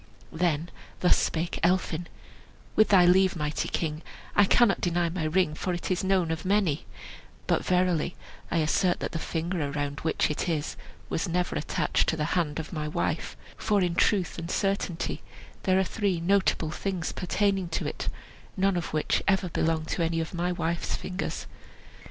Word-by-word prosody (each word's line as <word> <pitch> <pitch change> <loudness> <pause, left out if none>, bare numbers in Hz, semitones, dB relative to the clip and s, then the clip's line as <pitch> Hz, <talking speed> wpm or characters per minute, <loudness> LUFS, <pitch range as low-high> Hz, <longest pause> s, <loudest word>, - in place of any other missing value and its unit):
Then 165 -1 0 0.3
thus 180 - +5
spake 165 +1 -1
Elphin: 175 -1 +1 0.7
"With 215 - +6
thy 185 -3 +7
leave, 185 +2 +5
mighty 150 -2 -2
king, 155 -1 -2 0.3
I 205 - +6
cannot 225 +1 +4
deny 175 -1 +1
my 165 -1 -2
ring, 155 0 +2
for 180 +4 -2
it 175 - -4
is 185 - 0
known 190 -3 +2
of 160 - -3
many; 185 -6 +1 0.6
but - - +1
verily 180 -2 +1 0.3
I - - 0
assert 170 +3 +2
that - - -3
the 165 - -3
finger 170 +2 -2
around 145 0 -3
which 160 - +1
it 150 - -2
is 155 -2 -1 0.3
was 175 +2 -2
never 180 +1 0
attached 150 +1 0
to 160 - 0
the 150 - 0
hand 160 -5 0
of 160 +2 -5
my 155 -2 -2
wife; 150 - -2 0.2
for 210 -2 +2
in 175 -1 +1
truth 180 0 +2
and 165 +1 -5
certainty 195 -3 -1 0.4
there 185 -1 +4
are 190 - +4
three 190 -2 -1
notable 175 -3 +2
things 185 -1 -2
pertaining 195 0 0
to 165 - -2
it, - - -3 0.5
none 190 -1 +2
of 170 - -4
which 155 - +1
ever 195 -2 +2
belonged 160 -1 0
to - - -1
any 165 0 0
of 160 +1 -3
my 175 +1 0
wife's 170 -1 -1
fingers. 185 +1 -4
175 Hz, 175 wpm, -28 LUFS, 160-185 Hz, 0.7 s, thy